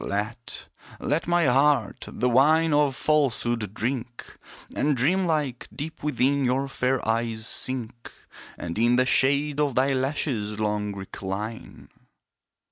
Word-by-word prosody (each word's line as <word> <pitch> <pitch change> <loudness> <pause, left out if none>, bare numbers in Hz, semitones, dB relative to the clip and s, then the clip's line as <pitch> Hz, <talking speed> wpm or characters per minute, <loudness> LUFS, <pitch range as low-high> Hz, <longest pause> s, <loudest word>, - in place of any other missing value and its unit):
Let 110 +4 -4 0.3
let 150 +5 -1
my 175 -1 +3
heart, 140 +3 +2
the 125 - 0
wine 155 +6 +4
of 145 -2 +3
falsehood 120 -8 0
drink, 125 0 -4 0.4
And 145 -2 +1
dream 180 +9 +2
like, 145 -6 -1
deep 155 +3 -7
within 140 -1 +1
your 130 +2 +1
fair 130 -2 -1
eyes 115 -1 -1
sink, 120 -2 -4 0.5
And 85 +4 -5
in 120 +1 +4
the 130 +1 +3
shade 140 +3 +2
of 145 -4 +1
thy 135 +2 +3
lashes 130 -6 -1
long 105 -1 -1
recline! 100 +3 -6
130 Hz, 125 wpm, -25 LUFS, 115-145 Hz, 0.5 s, wine